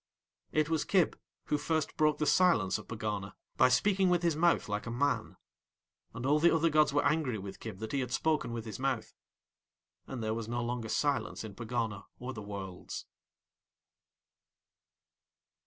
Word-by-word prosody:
It 155 -1 +2
was 160 -2 +1
Kib 185 -5 +2 0.3
who 150 - 0
first 160 -1 -1
broke 155 -1 +3
the 150 - 0
Silence 145 - +4
of - - -12
Pegana, 105 -3 -4 0.2
by - - +5
speaking 190 +9 +3
with 175 -1 +2
his 170 -3 +2
mouth 170 +2 +3
like 105 +2 -3
a - - -2
man. 140 +5 0 0.8
And 115 +2 -4
all 145 +3 +4
the 170 +2 +6
other 165 0 +3
gods 150 -1 +4
were 145 +1 +2
angry 150 -7 +1
with 95 -1 -8
Kib 110 -4 -7
that 110 +2 -6
he 140 - 0
had 125 -2 -3
spoken 155 -1 +1
with 115 -1 -4
his 110 - -6
mouth. 135 -3 -1 0.9
And 125 -4 -5
there 110 0 0
was 115 -1 -4
no 120 +1 -2
longer 120 -1 -3
silence 145 -2 0
in 110 -2 -7
Pegana 110 -2 -3
or 125 +1 -5
the 105 - -7
Worlds. 100 -3 -6
125 Hz, 170 wpm, -32 LUFS, 110-155 Hz, 0.9 s, the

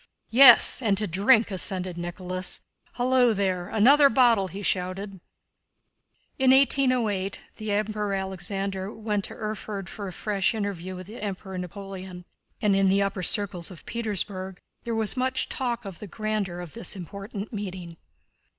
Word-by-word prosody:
"Yes, 250 +1 +8
and 205 -5 +1
to 210 - +1
drink," 210 +5 +3
assented 185 -1 -1
Nicholas. 180 +1 -2 0.3
"Hullo 245 -2 +3
there! 185 -3 -1
Another 275 +7 +5
bottle!" 230 -5 +4
he 195 +3 -8
shouted. 190 +1 -2 1.2
In 260 -1 +4
1808 255 -8 +3 0.2
the 215 -1 -6
Emperor 210 -1 -1
Alexander 195 +1 -4
went 210 -3 -2
to - - -8
Erfurt 210 -3 -5
for 200 -2 -7
a - - -6
fresh 205 +3 -1
interview 190 -4 -4
with 185 0 -8
the 215 +5 -10
Emperor 195 -2 -5
Napoleon, 185 0 -8 0.4
and 205 -2 +3
in 195 -1 +3
the 200 +1 +3
upper 195 -1 -3
circles 180 -1 0
of 180 -4 -13
Petersburg 195 -4 -3 0.3
there 235 -1 -2
was 220 -2 +2
much 260 0 -1
talk 240 -3 -3
of 195 -3 -8
the 210 - -8
grandeur 205 -3 -3
of 175 -3 -9
this 230 - -3
important 200 +4 -7
meeting. 185 -5 -6
200 Hz, 150 wpm, -26 LUFS, 185-220 Hz, 1.2 s, Yes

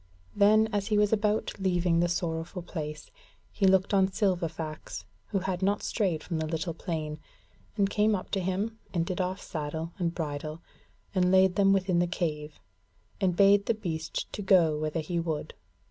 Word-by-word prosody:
Then 215 +2 +5
as 200 -1 0
he 215 - +2
was 210 +1 +3
about 210 0 +1
leaving 180 -3 +2
the 175 0 +2
sorrowful 170 +1 -3
place, 155 - -6 0.4
he 195 - +2
looked 190 +1 +3
on 190 -1 +5
Silverfax, 170 -5 -2 0.2
who 205 - -1
had 190 -1 -2
not 200 +2 +1
strayed 180 -8 0
from 165 -3 -3
the 160 - -1
little 160 +1 -2
plain, 155 -3 -4 0.6
and 200 -1 +3
came 210 +1 +2
up 185 - -6
to 195 - +1
him 195 +5 -2 0.2
and 165 -1 +1
did 185 +1 -2
off 185 +1 -2
saddle 160 +1 -4
and 170 -1 -1
bridle, 155 0 -4 0.5
and 180 -2 +3
laid 190 -1 +5
them 195 -1 +4
within 185 -2 +2
the 175 - +2
cave, 150 -4 -3 0.6
and 185 -3 +2
bade 200 +1 +5
the 230 - +2
beast 165 -7 -4 0.2
go 175 -5 +5
whither 155 +2 -2
he 170 +2 -2
would. 160 -3 -3
180 Hz, 175 wpm, -29 LUFS, 160-195 Hz, 0.6 s, Then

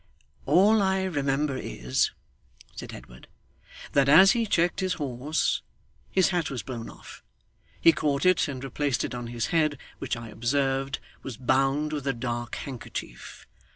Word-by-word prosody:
'All 200 +9 +5
I 190 -1 +1
remember 145 -4 0
is,' 60 - -1 0.7
said - - -7
Edward, - - -12 0.6
'that 140 -1 +3
as 190 +7 +8
he 230 -2 +1
checked 175 -2 +1
his 185 -1 0
horse 145 +2 -1 0.5
his 190 -2 +3
hat 175 -3 0
was 130 -4 -4
blown 120 -3 -6
off. - - -13 0.6
He 165 - +7
caught 145 -1 0
it, 185 -2 +4
and 135 -2 -6
replaced 135 -1 -1
it - - -4
on 120 -1 -5
his 120 -1 -2
head, 155 -3 +2 0.2
which - - -2
I 115 -1 -8
observed 135 +3 0 0.2
was 130 -4 -7
bound 135 +4 +1
with 145 -2 -3
a 135 - +2
dark 120 -1 -4
handkerchief. 120 - -7
140 Hz, 155 wpm, -27 LUFS, 125-165 Hz, 0.7 s, as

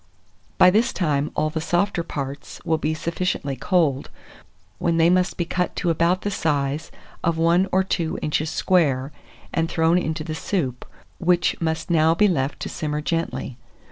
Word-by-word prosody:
By 180 - +7
this 220 +5 +2
time 150 -4 0
all 155 0 0
the 160 0 -3
softer 175 +2 0
parts 140 -3 -6
will 160 -1 +1
be 155 +1 -1
sufficiently 170 -4 -2
cold; 145 -1 +1 0.7
when 170 -1 +1
they 165 +1 +5
must 185 0 +1
be 175 - 0
cut 180 +1 -2
to 175 - 0
about 170 +3 +2
the 205 - -1
size 145 -3 -1 0.3
of 165 -1 +1
one 170 +3 +3
or 190 +1 +3
two 170 -3 -2
inches 150 +1 -1
square, 145 -8 +1 0.4
and 165 0 0
thrown 165 +2 +3
into 160 -2 -3
the 155 0 -4
soup, 150 -7 -2 0.3
which 175 -1 +2
must 160 +1 -2
now 160 0 +4
be 210 +4 +4
left 145 -7 -1
to - - -3
simmer 150 -1 -3
gently. 165 -5 -3
165 Hz, 170 wpm, -23 LUFS, 150-175 Hz, 0.7 s, By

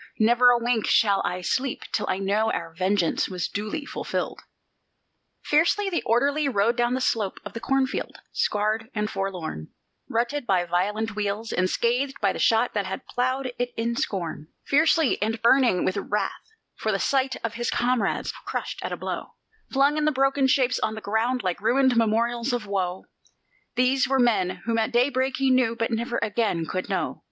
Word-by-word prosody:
Never 240 +3 +5
a 245 - +5
wink 235 -2 0
shall 200 -3 +4
I 180 +1 -2
sleep 255 +9 -1
till - - -1
I - - +1
know 205 +3 +1
our 165 - -4
vengeance 185 0 +1
was 180 -2 -2
duly 215 +9 -4
fulfilled." - - -4 1.0
Fiercely 345 +6 +2
the 340 - 0
orderly 280 +5 +2
rode 225 0 +2
down 240 +1 +1
the - - -1
slope 215 -6 0
of - - -7
the 230 - -5
cornfield 270 +1 -1
scarred 215 +2 0
and 210 0 -1
forlorn, 180 - -4 0.4
Rutted 240 +4 -1
by 180 -2 +2
violent 205 +6 -1
wheels, 210 +2 -2
and 185 0 +1
scathed 250 +6 0
by 200 - +1
the - - -6
shot 225 +2 +3
that 205 -3 -1
had 190 - -5
ploughed 255 +1 -1
it 245 0 -2
in 230 +1 -1
scorn; 170 -8 -3 0.2
Fiercely, 315 0 +3
and 220 +2 -1
burning 240 -6 +4
with 185 - 0
wrath 210 - -3 0.3
for 220 - -1
the 195 - +1
sight 265 +3 +1
of 230 -1 -2
his 240 0 -2
comrades 245 -4 0
crushed - - -5
at - - -3
a - - -3
blow, - - -5 0.4
Flung 280 +2 +3
in 305 - +1
broken 270 0 +2
shapes 255 -1 +2
on 220 - -1
the 220 - -7
ground 225 +4 0
like 185 0 -2
ruined 260 +3 +3
memorials 235 +2 +1
of 240 -3 -2
woe; 190 -2 -2 0.7
These 255 +1 +3
were 270 +1 +2
the 255 - +4
men 200 -6 +2 0.2
whom 230 0 +1
at 220 +2 0
daybreak 260 +1 +1
he 270 0 +2
knew, 255 -3 +3
but 230 +1 -2
never 235 +1 -1
again 210 -6 0
could 185 +3 -4
know. - - -2
230 Hz, 180 wpm, -25 LUFS, 205-255 Hz, 1.0 s, Never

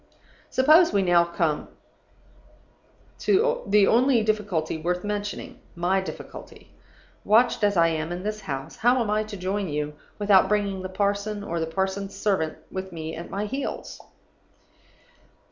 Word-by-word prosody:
"Suppose 310 +6 +5
we 200 -1 +2
come 175 -1 +4
now 155 -3 0 1.5
to 470 +5 +2
the 205 0 +5
only 240 +2 +4
difficulty 205 -8 -1
worth 180 +2 -2
mentioning 205 -1 -4 0.2
my 180 +3 +1
difficulty. 190 - -10 0.5
Watched 230 +1 +3
as 205 -2 +3
I 165 0 +5
am 160 0 -3
in 175 +1 -4
this 215 +1 -3
house, 135 +2 -6
how 245 +3 +3
am 220 -3 0
I 215 0 +1
to 210 -1 -8
join 190 +1 -2
you 150 0 -3 0.2
without 200 -2 +4
bringing 200 -2 0
the 185 - -5
parson 200 +2 -1
or 170 -3 -3
the 160 - -1
parson's 190 +3 -2
servant 185 -7 0
with 190 0 -5
me 160 -1 -6
at 170 - -8
my 200 +2 -3
heels? 270 +6 -5
200 Hz, 145 wpm, -25 LUFS, 175-210 Hz, 1.5 s, Suppose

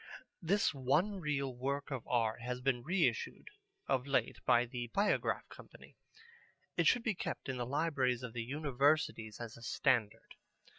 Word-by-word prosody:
This 190 +1 +2
one 150 +10 +1
reel 140 -5 -1
work 140 +3 -3
of 130 -4 -4
art 115 -2 +1
has 125 +1 -3
been 125 -1 +1
reissued 185 - 0 0.4
of 130 +1 +1
late 130 -4 +1
by 120 +1 +5
the 120 0 -5
Biograph 200 - +1
Company. - - -14 0.8
It - - +3
should 245 - +4
be 220 - +1
kept 185 - -5
in 130 -1 -2
the 120 -1 -2
libraries 135 -4 +1
of 120 -3 -6
the 120 - -3
Universities 140 -3 0
as 120 -2 -6
a - - -13
standard. 115 -2 0
130 Hz, 155 wpm, -35 LUFS, 120-150 Hz, 0.8 s, by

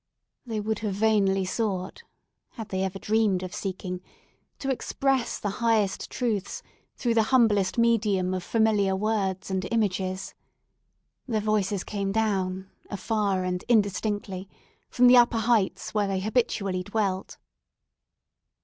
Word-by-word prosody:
They 220 -2 -2
would 220 +1 -2
have 210 -3 -2
vainly 200 -3 +2
sought—had 210 - -6
they 190 0 -1
ever 190 0 -3
dreamed 210 -3 +1
of 185 - -6
seeking—to 185 +7 -6
express 265 -1 0
the 205 - -3
highest 220 -4 +1
truths 220 -6 -2 0.3
through 240 -2 0
the 225 - +4
humblest 215 -7 +3
medium 210 -6 +2
of 185 - -2
familiar 210 -2 +2
words 195 -2 -1
and 190 -1 -1
images. 190 -4 -1 0.9
Their 225 -4 0
voices 205 -2 0
came 200 -2 -3
down, 195 -3 -1 0.2
afar 200 -2 -1
and 180 0 -2
indistinctly, 205 -3 0 0.4
from 250 - +3
the 250 0 +8
upper 240 -1 +5
heights 225 -3 +1
where 210 -2 +1
they 195 -1 -1
habitually 200 -3 0
dwelt. 195 -1 -2
205 Hz, 120 wpm, -26 LUFS, 190-225 Hz, 0.9 s, the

